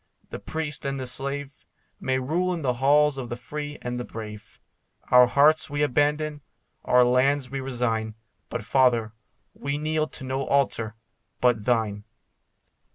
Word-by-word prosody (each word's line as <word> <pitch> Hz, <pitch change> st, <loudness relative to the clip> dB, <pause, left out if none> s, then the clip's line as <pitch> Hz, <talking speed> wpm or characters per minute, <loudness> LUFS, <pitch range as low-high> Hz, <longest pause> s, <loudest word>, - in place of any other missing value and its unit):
The -, -, -5 dB
priest 155 Hz, -3 st, -4 dB
and 140 Hz, 0 st, -2 dB
the 130 Hz, -, -4 dB
slave 140 Hz, +2 st, -2 dB, 0.5 s
May 130 Hz, 0 st, 0 dB
rule 175 Hz, +8 st, 0 dB
in 165 Hz, -, -6 dB
the 125 Hz, -2 st, +1 dB
halls 145 Hz, 0 st, +4 dB
of 125 Hz, -2 st, -6 dB
the 120 Hz, -, -4 dB
free 145 Hz, +4 st, -6 dB
and 125 Hz, 0 st, -3 dB
the -, -, -3 dB
brave. 105 Hz, -3 st, -9 dB, 0.5 s
Our 125 Hz, 0 st, +8 dB
hearths 150 Hz, +5 st, +4 dB
we 145 Hz, +1 st, 0 dB
abandon; 150 Hz, +2 st, +1 dB, 0.4 s
our 125 Hz, 0 st, +5 dB
lands 130 Hz, +2 st, +2 dB
we 135 Hz, -, -3 dB
resign; 115 Hz, -4 st, -2 dB, 0.3 s
But, -, -, -4 dB
Father, 120 Hz, -3 st, +2 dB, 0.4 s
we 140 Hz, +1 st, -3 dB
kneel 155 Hz, +1 st, 0 dB
to 130 Hz, -, -9 dB
no 130 Hz, +1 st, -2 dB
altar 115 Hz, -5 st, +1 dB, 0.4 s
but 120 Hz, -4 st, +2 dB
thine. 110 Hz, -4 st, 0 dB
135 Hz, 155 wpm, -25 LUFS, 125-145 Hz, 0.5 s, Our